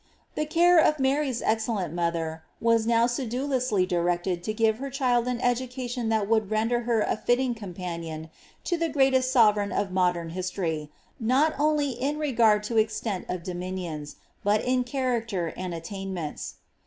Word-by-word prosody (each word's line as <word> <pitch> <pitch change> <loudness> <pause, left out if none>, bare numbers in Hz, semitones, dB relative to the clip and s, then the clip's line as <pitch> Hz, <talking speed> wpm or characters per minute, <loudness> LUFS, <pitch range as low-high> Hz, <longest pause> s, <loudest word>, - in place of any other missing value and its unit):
The 305 - -2
care 345 +2 +5
of 305 -1 +4
Mary's 270 -2 0
excellent 220 -6 -1
mother^ 165 -2 -1 0.2
was 230 -1 +2
now 230 0 +4
sedulously 250 -3 0
directed 175 0 0
to - - 0
give 220 0 +1
her 275 +1 -4
child 250 -3 +1
an 250 -1 -1
education 245 -1 -1
that 220 -2 +1
would 220 -2 +2
render 225 +3 +1
her 230 -2 +3
a - - +1
fitting 245 +3 +1
companion 170 -6 -6 0.3
to 350 - 0
the 330 0 0
greatest 265 -3 +3
sovereign 210 -5 +4
of 195 - -1
modern 180 -3 +1
his 185 +1 -3
tory, 160 -5 -3 0.3
not 265 +7 +3
only 295 -2 +2
in 275 +5 -2
regard 230 -8 +3
to 225 +2 -2
extent 215 -2 0
of 180 -2 -3
dominions, 180 -4 -5 0.3
but 205 +1 +2
in 250 0 +2
character 235 - -2
and 185 -1 -4
attainments. 185 -2 -5
220 Hz, 155 wpm, -26 LUFS, 180-255 Hz, 0.3 s, care